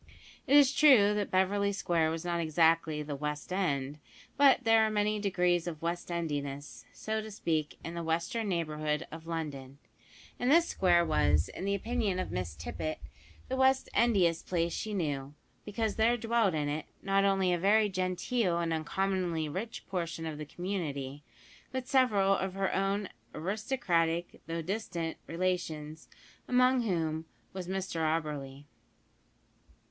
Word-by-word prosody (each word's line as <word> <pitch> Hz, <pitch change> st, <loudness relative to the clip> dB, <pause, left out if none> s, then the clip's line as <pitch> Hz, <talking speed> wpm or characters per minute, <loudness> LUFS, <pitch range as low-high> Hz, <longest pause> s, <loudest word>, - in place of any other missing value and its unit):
It 285 Hz, -, +6 dB
is 285 Hz, -1 st, +6 dB
true 255 Hz, -9 st, +6 dB
that 210 Hz, -1 st, -1 dB
Beverly 200 Hz, +2 st, +2 dB
Square 170 Hz, -4 st, +1 dB
was 165 Hz, +1 st, -4 dB
not 170 Hz, -1 st, -1 dB
exactly 160 Hz, -1 st, +2 dB
the 145 Hz, -1 st, -5 dB
"West 150 Hz, +4 st, -4 dB
End," 145 Hz, -6 st, -1 dB, 0.4 s
but 275 Hz, -2 st, +5 dB
there 225 Hz, -1 st, +5 dB
are 220 Hz, -, +2 dB
many 210 Hz, 0 st, 0 dB
degrees 180 Hz, -4 st, +1 dB
of 160 Hz, -3 st, -4 dB
West 175 Hz, +1 st, -3 dB
endiness, 145 Hz, -4 st, -4 dB
so 220 Hz, 0 st, -3 dB
to 220 Hz, -, -8 dB
speak, 160 Hz, -7 st, -2 dB
in 165 Hz, -, -5 dB
the 170 Hz, -, -4 dB
western 170 Hz, +7 st, -1 dB
neighbourhood 155 Hz, -2 st, -1 dB
of 165 Hz, +1 st, -9 dB
London, 140 Hz, -5 st, -5 dB, 0.6 s
and 245 Hz, -, +1 dB
this 335 Hz, +2 st, +5 dB
square 175 Hz, -2 st, +3 dB
was, 75 Hz, -, +2 dB
in 190 Hz, -, -6 dB
the 200 Hz, 0 st, +1 dB
opinion 215 Hz, -2 st, -1 dB
of 185 Hz, -, -3 dB
Miss 90 Hz, -3 st, -3 dB
Tippet, 80 Hz, 0 st, -4 dB, 0.5 s
the 260 Hz, -, -2 dB
West 265 Hz, 0 st, +3 dB
endiest 185 Hz, -8 st, +2 dB
place 170 Hz, -1 st, 0 dB
she 215 Hz, -1 st, -3 dB
knew, 145 Hz, -5 st, -3 dB, 0.3 s
because 215 Hz, +1 st, -2 dB
there 230 Hz, +2 st, +3 dB
dwelt 225 Hz, -5 st, +1 dB
in 150 Hz, -1 st, -1 dB
it, 150 Hz, +1 st, -3 dB, 0.2 s
not 195 Hz, 0 st, +2 dB
only 195 Hz, -2 st, +2 dB
a 175 Hz, -, 0 dB
very 210 Hz, +4 st, +4 dB
genteel 185 Hz, +1 st, 0 dB
and 170 Hz, -1 st, 0 dB
uncommonly 170 Hz, 0 st, -1 dB
rich 190 Hz, +10 st, -5 dB
portion 170 Hz, -3 st, -3 dB
of 155 Hz, -2 st, -5 dB
the 150 Hz, -, -5 dB
community, 145 Hz, -7 st, -4 dB, 0.5 s
but 260 Hz, -1 st, -4 dB
several 205 Hz, -7 st, +3 dB
of 190 Hz, -1 st, -3 dB
her 195 Hz, -1 st, 0 dB
own 195 Hz, +1 st, 0 dB, 0.3 s
aristocratic, 175 Hz, -, -1 dB
though 165 Hz, 0 st, -3 dB
distant, 175 Hz, -3 st, -3 dB
relations, 165 Hz, -3 st, -3 dB, 0.4 s
among 250 Hz, 0 st, +4 dB
whom 165 Hz, -7 st, -1 dB, 0.3 s
was 185 Hz, -2 st, -6 dB
Mr 190 Hz, -2 st, -3 dB
Auberly. 150 Hz, -3 st, -2 dB
175 Hz, 150 wpm, -31 LUFS, 155-205 Hz, 0.6 s, It